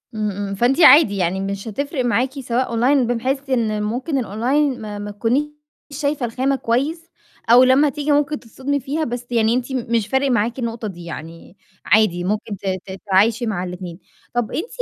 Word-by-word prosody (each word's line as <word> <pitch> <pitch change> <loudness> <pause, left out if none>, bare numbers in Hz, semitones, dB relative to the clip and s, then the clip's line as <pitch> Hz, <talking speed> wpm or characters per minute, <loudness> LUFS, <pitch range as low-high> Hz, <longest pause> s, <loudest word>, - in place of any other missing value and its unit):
إمم 215 -1 -1
إمم 200 0 -4
فأنتِ 245 - +2
عادي 290 -9 +7
يعني 185 +1 0
مش 195 +2 -4
هتفرِق 275 +4 -3
معاكِ 250 +2 +1
سواء 250 0 -1
أونلاين 245 +2 +2
بحيث 265 +4 -2
إن 220 -5 0
ممكن 255 +7 -2
الأونلاين 255 +5 0
ما 210 -1 -6
ما 205 0 -5
تكونيش 230 +7 +1 0.5
شايفة 285 -2 -1
الخامة 260 +4 0
كويس، 285 +8 -2 0.4
أو 245 +2 +8
لمّا 265 +3 +4
تيجي 295 +1 -2
ممكن 290 0 +1
تتصدمي 265 +4 -3
فيها 285 +4 -3
بس 245 -3 -4
يعني 225 -1 +2
أنتِ 250 +2 -2
مش 230 -4 -1
فارق 265 +4 +1
معاكِ 235 +2 0
النقطة 230 -2 -3
دي 175 -4 -9
يعني 165 +3 -9 0.3
عادي 205 -4 +3
ممكن 205 +2 -2
ت 195 - -14 0.2
ت 195 - -8
تتعايشي 205 +5 +1
مع 200 -5 -2
الاتنين. 180 -1 -7 0.3
طَب 240 -2 -1
أنتِ 345 - -3
235 Hz, 180 wpm, -20 LUFS, 205-270 Hz, 0.5 s, أو